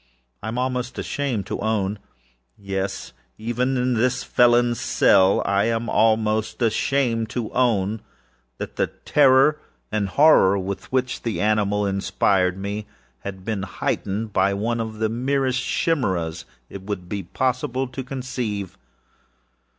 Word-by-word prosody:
I - - -6
am 115 +2 -3
almost 125 -1 -2
ashamed 130 -8 -2
to - - -4
ownâyes, 95 - -4 0.3
even 125 +4 -1
in 125 0 +1
this 125 +2 +1
felonâs 120 0 +3
cell, 95 0 +4
I 100 0 +2
am 115 0 -1
almost 110 -1 +1
ashamed 115 0 +1
to 120 -3 -3
ownâthat 110 -4 +1 0.8
the - - +2 0.2
terror 140 +1 +5 0.3
and 105 -2 -1
horror 120 -8 +5
with 95 +1 -5
which 130 -1 -1
the 115 -3 -3
animal 105 -1 +1
inspired 95 -1 +1
me, 100 +2 -4 0.3
had 95 +3 -8
been 110 -3 -2
heightened 100 +2 -3
by 100 +1 +2
one 115 +4 -1
of 110 -1 -4
the 110 0 +1
merest 130 +2 0
chimaeras 95 - -1 0.2
it 100 - -9
would 95 -2 -5
be 100 +1 -3
possible 130 +6 -1
to 130 +1 -6
conceive. 125 -7 -4
110 Hz, 125 wpm, -23 LUFS, 100-125 Hz, 0.8 s, terror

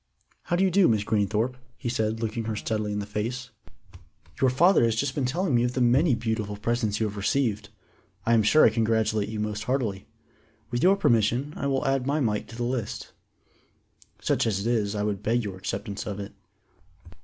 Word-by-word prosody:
"How 175 - 0
do 180 - +2
you 190 - +3
do, 195 0 +5
Miss 110 -3 +2
Greenthorpe," 110 +4 0 0.2
he 125 - -5
said, 110 -2 -1
looking 115 0 -2
her 110 -1 -2
steadily 105 -1 -2
in 105 - -2
the 105 - -3
face. 120 +5 -4 0.9
"You 130 - +5
father 170 +5 +4
has 115 -1 +2
just 135 +3 -1
been 135 -2 -1
telling 170 +4 -1
me 120 0 +3
of 125 0 0
the 130 - -2
many 125 +4 +4
beautiful 110 -3 -3
presents 110 -1 -1
you 110 - +1
have 105 -1 -5
received. 105 -1 0 0.6
I 115 - +3
am 115 - +5
sure 155 +9 +5
I - - +5
congratulate 110 -2 +1
you 110 -1 -4
most 105 0 -3
heartily. 115 -7 -2 0.6
With 120 - -1
your 185 +4 +5
permission 120 - +1
I 140 - -2
will 135 -1 0
add 135 -1 0
my 145 +2 +1
mite 105 -6 -1
to 110 - -11
the 120 - -3
list. 120 -3 -3 1.1
Such - - +1
as 100 -3 0
it - - -5
is, 105 -2 0
I 105 - -1
would 105 -2 -2
beg 115 +3 +1
your 100 -3 -5
acceptance 100 +2 -5
of 100 -1 -4
it." 100 0 -7
115 Hz, 205 wpm, -26 LUFS, 105-130 Hz, 1.1 s, do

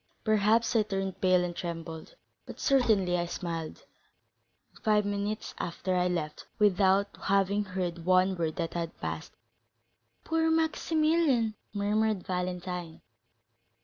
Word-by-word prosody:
Perhaps 220 +2 +3
I 225 - +5
turned 195 -2 -3
pale 185 -1 +4
and 175 -1 -3
trembled, 165 -2 -6 0.3
but - - -9
certainly 210 - +3
I 175 - -1
smiled; 165 -3 -5 0.9
and - - -20
five 210 -1 +3
minutes 205 +1 -3
after 185 +2 -2
I 180 0 +2
left, 160 -4 -3
without 200 -1 +3
having 200 +1 +2
heard 180 -3 -3
one 185 +1 +3
word 165 -3 -2
that 165 -2 -3
had 170 -1 -4
passed." - - -5 0.9
"Poor 325 0 +1
Maximilian!" 315 -6 +2 0.2
murmured 210 0 0
Valentine. 180 -2 -4
190 Hz, 120 wpm, -29 LUFS, 175-215 Hz, 0.9 s, I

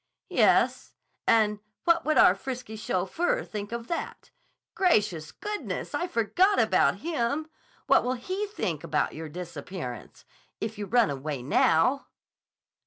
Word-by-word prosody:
"Yes: - - +3 0.3
and 210 -2 +3 0.2
what 335 0 +3
would 310 - +2
our 180 - +7
frisky 245 +1 -6
chauffeur 220 - -1
think 205 -1 -6
of 235 0 -4
that! 335 +7 -5 0.4
Gracious 205 - +1
goodness! 420 0 -5
I 350 - -1
forgot 365 - +2
about - - +3
him. 300 -1 -1 0.4
What - - +4
will 255 +1 0
he 375 +11 -3
think 185 - -3
about - - 0
your 160 0 -7
disappearance 175 -4 -7 0.3
if 220 0 -4
you 205 - -4
run 235 -4 +3
away 140 -1 -4
now?" 165 - +3
225 Hz, 130 wpm, -27 LUFS, -, 0.4 s, our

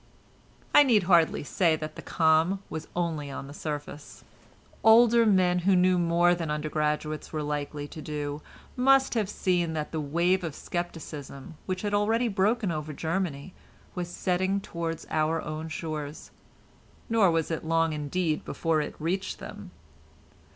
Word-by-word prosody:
I - - +9
need 235 -8 +4
hardly 170 -4 +3
say 165 +2 +2
that 155 0 -6
the - - -8
calm 165 +4 +2
was 160 -1 -5
only 165 -4 -2
on 135 - -6
the 140 - -10
surface. 150 -1 -7 0.6
Older 230 +1 +6
men, 180 -3 +3
who 190 +2 +3
knew 180 0 +4
more 175 +1 +3
than 170 -3 -3
undergraduates 150 0 -2
were 155 -1 -3
likely 145 0 -3
to 155 - -9
do, 150 -1 -4 0.3
must 270 +1 +4
have 215 -5 0
seen 175 -5 0
that 155 -1 -3
the 160 - -2
wave 170 +6 +1
of 160 -4 -4
scepticism 155 -5 -6
which 185 +1 -3
had 205 -1 -2
already 225 +4 +2
broken 205 +1 +1
over 155 -1 -4
Germany 165 0 -3 0.4
was 175 -1 -4
setting 185 +2 0
towards 165 -3 -5
our 155 +1 +1
own 155 +1 -5
shores, 155 -1 -6 0.8
nor 225 -5 +4
was 165 -1 0
it 160 - -3
long, 165 0 +1
indeed, 155 +2 -1
before 165 -2 0
it 150 - -5
reached 185 +5 -2
them. 205 -2 -9
165 Hz, 150 wpm, -27 LUFS, 155-190 Hz, 0.8 s, I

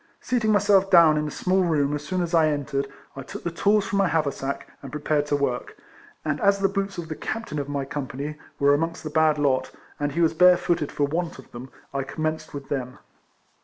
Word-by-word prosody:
Seating 235 -4 0
my 210 - +5
self 200 -1 +3
down 170 -4 +7
in 150 0 -1
a - - -3
small 185 +4 +1
room 145 -4 +1
as 145 0 -3
soon 180 +4 -1
as 170 0 -4
I 160 -2 +5
en 145 -2 -1
tered, 140 -2 -2 0.3
I 135 - -6
took 130 - -9
the 170 - -2
tools 205 +4 +2
from 200 - -1
my 195 - +4
haversack 140 -4 -2
and 135 - -9
prepared 150 -1 0
to 145 - +1
work; 135 -4 -2 0.5
and 150 -1 -1
as 200 -1 +4
the 195 0 +2
boots 195 0 -3
of 170 -2 -5
the 160 - -4
Captain 225 -7 -4
of 140 0 -4
my 140 -1 -2
Company, 145 +1 -5 0.2
were 140 0 +4
amongst 165 +4 -1
the 155 - -5
bad 155 -1 +3
lot, 140 -3 +1 0.3
and 145 -1 -1
he 170 - 0
was 165 -1 +3
bare 180 +2 +6
footed 170 -5 -1
for 145 - +1
want 165 +4 -3
of 130 - -14
them, 125 +2 -9 0.2
I 140 - -1
commenced 155 +3 -3
with 140 -1 -7
thein. 125 -3 -4
155 Hz, 235 wpm, -25 LUFS, 140-175 Hz, 0.5 s, down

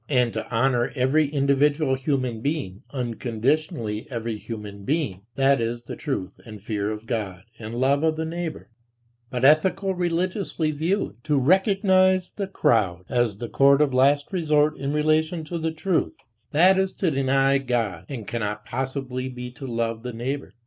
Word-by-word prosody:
And 125 -4 +2
to - - -4
honor 120 +1 +1
every 140 +4 +3
individual 140 0 +2
human 130 -4 -1
being, 140 - -3
unconditionally 120 - -2
every 115 -3 -3
human 105 -2 -8
being, 135 - -1
that 135 -2 +3
is 120 +1 -2
the - - -7
truth 130 - -4
and 110 -2 -10
fear 105 0 -2
of 110 +1 -5
God 100 -7 -3 0.2
and 110 +1 -6
love 135 +3 +2
of 160 -1 +2
"the 160 +1 -2
neighbor"; 165 -5 -5 0.6
but 125 -2 -3
ethico 190 +7 +4
religiously 175 -1 -1
viewed, 155 - -2
to 150 -2 +2
recognize 185 - +3
"the 200 -2 -4
crowd" 95 - +1
as 120 -5 +1
the 120 - -5
court 140 +3 +4
of 150 -3 +2
last 140 +6 +3
resort 155 -3 +2
in 140 0 -3
relation 155 +2 +1
to 170 +2 -4
"the 160 0 -1
truth," 175 +3 0 0.4
that 185 +5 +5
is 190 0 0
to 180 -4 0
deny 135 0 +2
God 115 -10 -2
and 120 -6 -6
cannot 105 -2 -3
possibly 130 0 -3
be 125 -1 -7
to 135 +2 -8
love 115 -1 -2
"the 125 0 -6
neighbor." 130 +5 -4
135 Hz, 165 wpm, -24 LUFS, 115-155 Hz, 0.6 s, that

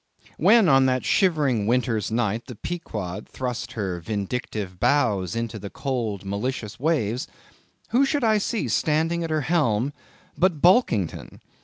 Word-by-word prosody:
When 210 +4 +6
on 135 -3 +5
that 130 -1 0
shivering 145 - +2
winter's 120 -3 +1
night, 115 0 -1
the 125 - -8
Pequod 105 - -5
thrust 125 -2 -4
her 95 -6 -3
vindictive 100 0 -4
bows 115 - +1
into 115 -2 -3
the 100 0 -7
cold 115 -8 -3
malicious 105 +2 -4
waves, 125 -6 0 0.6
who 250 +4 +3
should 285 0 0
I 220 -2 +4
see 215 +2 -2
standing 165 +1 +1
at 165 - -3
her 155 -1 0
helm 135 -5 +1 0.4
but 180 -4 +2
Bulkington! 155 - +2
125 Hz, 140 wpm, -24 LUFS, 105-160 Hz, 0.6 s, When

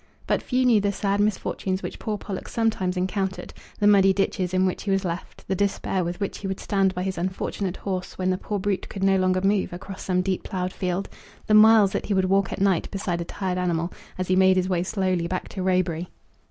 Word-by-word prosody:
But - - +1
few 255 0 +1
knew 230 -4 +5
the 200 0 +1
sad 200 0 -1
misfortunes 195 -2 -1
which - - -6
poor 215 -1 -2
Pollock 195 -2 -6
sometimes 205 -5 0
encountered; 190 +1 -2 0.2
the 205 - 0
muddy 195 -2 +6
ditches 190 -2 0
in 185 0 +2
which 185 - -1
he 205 - -4
was 195 0 +1
left; 170 +1 -6
the - - 0
despair 195 -1 0
with 175 +1 -4
which 200 - -3
he 200 - -4
would 190 0 -3
stand 195 -2 +1
by 180 - -2
his 190 -2 -3
unfortunate 185 +1 -3
horse 185 -2 -4
when 185 0 +1
the 185 - 0
poor 210 - -3
brute 195 0 -2
could 195 - -5
no 195 0 +4
longer 185 0 +2
move 195 0 +1
across 190 +2 -8
some 185 -1 0
deep 190 -1 -1
ploughed 185 -1 -3
field; 185 +1 -2 0.4
the 215 - +1
miles 215 -2 +7
that - - -3
he 205 - +1
would 190 -1 +3
walk 195 0 +2
at - - -4
night 195 -3 +2
beside 180 -3 -2
a - - -4
tired 185 0 -3
animal, 170 -1 -1 0.2
as 185 -1 -2
he 185 - +2
made 190 0 +5
his 185 0 +1
way 180 -2 +1
slowly 185 -2 0
back 185 +1 -3
to 190 - -5
Roebury! 180 -2 0
190 Hz, 235 wpm, -25 LUFS, 185-200 Hz, 0.4 s, miles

